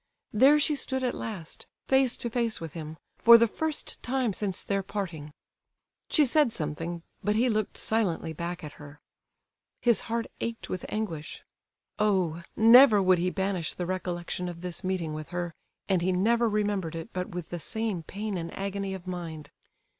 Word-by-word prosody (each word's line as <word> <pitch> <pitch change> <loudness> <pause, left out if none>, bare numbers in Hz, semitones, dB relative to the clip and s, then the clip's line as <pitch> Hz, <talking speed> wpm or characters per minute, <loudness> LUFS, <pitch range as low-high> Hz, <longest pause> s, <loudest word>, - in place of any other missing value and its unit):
There 265 +7 +6
she 300 +1 +3
stood 265 -2 -1
at 250 - 0
last, 190 -8 -6 0.2
face 265 -2 +3
to 240 - -3
face 230 -2 0
with 165 -3 -7
him, 160 -1 -7 0.2
for 235 0 +9
the 230 - +5
first 310 +7 -3
time 250 -4 0
since 195 -1 -2
their 195 -1 0
parting. 175 -7 -5 0.8
She 300 - +5
said 285 -1 +3
something, 165 0 -4 0.2
but 210 0 +1
he 245 +3 +3
looked 215 -2 -1
silently 180 -7 0
back 175 +2 -5
at 150 - -6
her. 145 0 -12 0.8
His 235 -2 +3
heart 230 0 0
ached 230 0 -4
with 185 - -4
anguish. 175 -8 -4 0.6
Oh! 185 -6 +1
never 230 0 +8
would 185 -2 +4
he 180 +1 +1
banish 190 -3 -2
the 180 - -3
recollection 180 -1 -3
of 170 -1 -8
this 180 -1 -5
meeting 185 -4 -2
with 155 0 -6
her, 175 -2 -3 0.3
and 190 -3 +2
he 185 +2 +1
never 230 +6 +2
remembered 205 -5 -1
it 165 -1 -7
but 180 0 -3
with 180 -2 -5
the 175 - -4
same 220 0 -2
pain 200 +3 -4
and 165 0 -5
agony 195 0 -3
of 185 -1 -10
mind. 165 -5 -6
190 Hz, 175 wpm, -28 LUFS, 170-225 Hz, 0.8 s, for